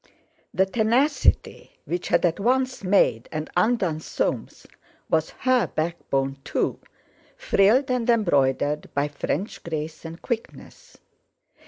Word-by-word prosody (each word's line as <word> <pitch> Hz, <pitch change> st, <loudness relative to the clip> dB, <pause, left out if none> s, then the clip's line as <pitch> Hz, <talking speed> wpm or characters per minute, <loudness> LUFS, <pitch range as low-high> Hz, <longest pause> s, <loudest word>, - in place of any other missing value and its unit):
The 190 Hz, -, +2 dB
tenacity 240 Hz, +8 st, +1 dB
which 175 Hz, +1 st, -3 dB
had -, -, +3 dB
at 170 Hz, +1 st, 0 dB
once 255 Hz, +2 st, 0 dB
made 185 Hz, -, +2 dB
and 155 Hz, 0 st, -4 dB
undone 180 Hz, -5 st, +1 dB
Soames -, -, -3 dB, 0.5 s
was 160 Hz, -1 st, +2 dB
her 255 Hz, -2 st, +3 dB
backbone, 140 Hz, -4 st, -2 dB
too, -, -, -1 dB, 0.6 s
frilled 240 Hz, +7 st, +3 dB
and 250 Hz, -1 st, 0 dB
embroidered 145 Hz, -, +1 dB
by 140 Hz, +1 st, +1 dB
French 150 Hz, +6 st, -3 dB
grace 155 Hz, -1 st, -5 dB
and 165 Hz, +1 st, -8 dB
quickness. 260 Hz, -, -7 dB
185 Hz, 115 wpm, -24 LUFS, 155-240 Hz, 0.6 s, had